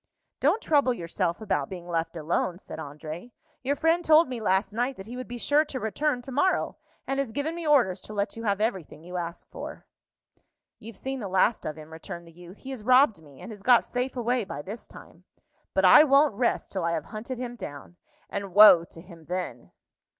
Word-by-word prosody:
"Don't 450 - +2
trouble 285 -5 +3
yourself 170 0 -2
about 150 -10 -1
being 180 -2 -8
left 170 0 -2
alone," 170 +3 -1
said - - -9
André; 155 +10 -8 0.3
"your 275 +3 0
friend 325 +3 +2
told 315 0 +6
me 250 -3 -5
last 195 0 +1
night 245 +4 -1
that 190 - -9
he 235 +3 -8
would 255 0 -6
be 245 - -6
sure 290 +5 +3
to 275 -3 -5
return 245 +4 -1
to 265 - -9
morrow, 365 +9 +1 0.3
and 270 0 -2
has 275 -5 -1
given 285 +7 -2
me 335 -2 -5
orders 235 -11 +3
to 215 - -10
let 200 0 -1
you 230 - -7
have 200 -2 0
everything 190 -8 -3
you 180 +1 -6
ask 170 -1 -5
for." - - -8 0.9
"You've 220 -2 -11
seen 265 +4 -4
the 210 - -4
last 190 +4 +2
of 155 - -3
him," 155 +1 -11
returned 170 +1 -8
the 165 - -15
youth. 175 +3 -13
"He 270 - -9
has 260 -4 -6
robbed 250 - +4
me, 145 -4 -16
and 235 - -8
has 205 -2 -10
got 240 +3 +5
safe 250 +1 -3
away 245 0 0
by 145 -7 -7
this 210 +7 -8
time. - - -15 0.5
But - - +3
I 300 - +9
won't 285 -2 +4
rest 235 +4 -1
till 190 -3 -2
I 170 0 0
have 165 - -2
hunted 230 +4 -6
him 245 -1 -5
down; 175 - -9 0.3
and 200 -2 -5
woe 205 -5 +9
to 165 - -13
him 170 -3 -15
then!" 180 +3 -5
215 Hz, 215 wpm, -27 LUFS, 175-255 Hz, 0.9 s, I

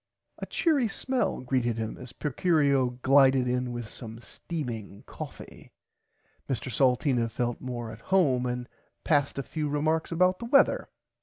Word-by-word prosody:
A - - -5
cheery 290 -8 +2
smell 255 - -1
greeted 125 -3 0
him 110 -1 -3
as 125 -1 -9
Procurio 140 -5 +1
glided 135 -1 +5
in 125 0 -1
with 120 -2 -5
some 115 0 -9
steaming 115 - -6
coffie. - - -10 0.8
Mr 130 0 -3
Salteena 125 -2 +2
felt 120 +1 -2
more 120 -3 -5
at 110 0 -11
home 135 -10 +2
and 125 0 -3 0.4
passed 145 -3 +1
a 140 - -2
few 150 +2 -3
remarks 155 +3 0
about 180 +2 +3
the 235 - -5
weather. 275 +4 +3
130 Hz, 145 wpm, -28 LUFS, 120-155 Hz, 0.8 s, glided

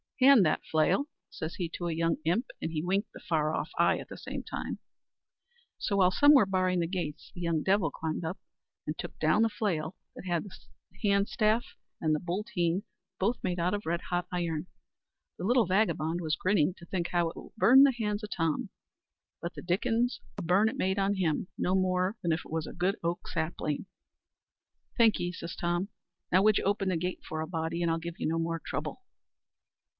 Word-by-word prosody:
Hand 260 -6 +7
that 155 - +1
flail," 155 - +2 0.2
says 160 0 -5
he 175 - -2
to 175 +1 -4
a - - -1
young 165 +1 +1
imp; 185 +10 +2 0.2
and 160 - -2
he 155 -1 -2
winked 195 +4 0
the - - -11
far 155 -2 0
off - - -2
eye - - +4
at - - -8
the - - -9
same - - -6
time. - - -4 1.0
So, 200 - 0
while 185 -2 +5
some 290 +9 +6
were 265 -7 +7
barring 185 -1 +1
the 170 - +1
gates, 170 -5 -4
the 175 - -8
young 165 -3 0
devil 190 -4 +3
climbed 160 +3 -4
up, 165 +4 -3 0.5
and 150 +1 -3
took - - -7
down 155 +7 +3
the 225 - +4
flail 185 -7 -2 0.2
that - - -9
had 175 -2 0
the 200 - -10 0.6
hand 200 0 +3
staff 220 +2 +1 0.2
and 155 -1 +2
booltheen 180 -1 -1 0.4
both 225 +6 0
made 180 -2 -1
out 175 +3 +1
of 205 0 -3
red 170 +1 0
hot 175 0 -1
iron. 170 -2 -2 0.7
The - - -6
little 240 +3 +4
vagabond 175 -4 +1
was 155 -2 0
grinning 185 -2 +2
to 170 - -12
think 175 -1 -2
how 175 -2 +1
it - - -10
would - - -11
burn 260 +5 +8
the 275 -1 +5
hands 210 -2 -2
o' - - -3
Tom, 165 -6 -1 0.7
but 170 +1 -5
the - - -6
dickens 230 +7 +1 0.2
a - - -3
burn 190 +6 +4
it 265 - -6
made 190 -4 +1
on 195 +1 +2
him, 175 -3 0
no 180 - +1
more 185 +1 +1
nor 170 -2 +2
if 160 - -6
it - - -13
was 160 -1 -2
a - - -7
good 180 +3 +1
oak 170 +1 -2
sapling. 160 -2 -2 1.1
"Thankee," 210 -7 +4
says 170 -1 -7
Tom. 175 +3 -1 0.4
"Now 185 - +5
would 215 -1 +5
you - - -4
open 200 -1 +1
the 180 - +1
gate 180 +2 -3
for 155 0 -4
a 160 - -3
body, 165 0 -2
and 170 - +2
I'll 165 - +1
give 170 +1 -7
you - - 0
no 165 +1 0
more 165 0 -1
trouble." - - -4
180 Hz, 210 wpm, -30 LUFS, 165-200 Hz, 1.1 s, burn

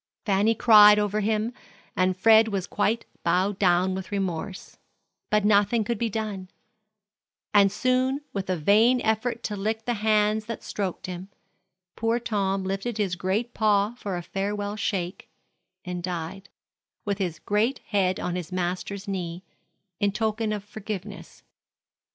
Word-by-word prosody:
Fanny 205 +2 +2
cried 210 -2 +8
over 210 0 0
him, 215 +2 0 0.4
and 185 0 +1
Fred 225 +3 +6
was 195 -4 -2
quite 220 +3 0 0.2
bowed 185 +3 +1
down 185 0 +3
with 190 +1 -6
remorse; 190 -1 -4 0.5
but 210 -1 +2
nothing 205 +2 +3
could 230 0 -3
be 235 - 0
done, 205 -4 -4 1.0
and 200 -1 +6
soon, 255 +4 +1
with 195 -2 -4
a 185 - +1
vain 220 +10 +4
effort 225 +2 0
to 210 - -3
lick 220 +2 -2
the 240 - 0
hands 215 0 +2
that 230 0 -6
stroked 195 -4 -4
him, 185 +1 -7 0.7
poor 230 +1 0
Tom 195 -4 -1
lifted 195 +4 -3
his 195 -4 0
great 195 +7 -2
paw 210 0 +2
for 200 -6 -5
a 175 - -5
farewell 205 +2 -3
shake, 185 -4 -3 0.6
and 180 -1 -4
died, 175 +2 -5 0.6
with 200 -1 -1
his 175 -4 -2
great 215 +6 0
head 190 -3 +1
on 180 - -2
his 180 -1 -5
master's 185 +3 -3
knee, 180 -2 -4 0.6
in 200 -1 +2
token 220 +1 -1
of 210 -2 -3
forgiveness. 210 -2 -8
205 Hz, 145 wpm, -26 LUFS, 190-220 Hz, 1.0 s, cried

